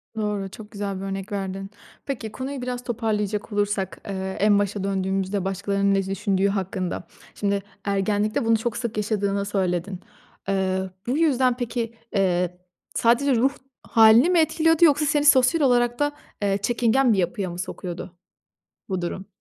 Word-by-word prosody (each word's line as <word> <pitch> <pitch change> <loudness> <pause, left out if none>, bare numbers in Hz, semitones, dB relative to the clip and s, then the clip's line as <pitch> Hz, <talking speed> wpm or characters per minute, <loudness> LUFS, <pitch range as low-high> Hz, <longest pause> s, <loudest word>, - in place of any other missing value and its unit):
Doğru. 210 -3 -2
Çok 210 +1 -11
güzel 200 -2 -4
bir - - -7
örnek 195 +2 -5
verdin. 195 -1 -4 0.4
Peki, 230 -6 -4
konuyu 265 +2 -5
biraz 250 0 -4
toparlayacak 215 -3 -2
olursak, 205 -1 -1
eee, 190 -1 -4
en 205 0 +4
başa 205 -1 -1
döndüğümüzde, 195 0 -1
başkalarının 200 +1 0
ne 195 -1 +1
düşündüğü 195 0 0
hakkında. 190 -2 -2 0.3
Şimdi, 200 -1 0 0.2
ergenlikte 205 +2 0
bunu 225 0 +4
çok 225 +1 -3
sık 235 -3 -4
yaşadığını 200 -2 0
söyledin. 185 -2 -1 0.5
Eee, 190 -1 0 0.2
bu 255 +4 +1
yüzden 260 -6 +3
peki, 235 -2 -3 0.2
eee, 180 -2 +1 0.4
sadece 245 +4 +3
ruh 265 +4 +2 0.3
hâlini 225 +6 +6
mi 360 -2 +4
etkiliyordu 325 +1 +4
yoksa 300 -1 +4
seni 295 -1 +2
sosyal 285 +3 +5
olarak 240 -2 +3
da 290 0 +2 0.3
eee, 200 -1 +1
çekingen 240 +3 +3
bir - - 0
yapıya 185 +1 -1
mı 175 - -7
sokuyordu, 180 -1 -6 0.7
bu 185 -3 -2
durum? 190 +3 -4
205 Hz, 150 wpm, -24 LUFS, 195-240 Hz, 0.7 s, hâlini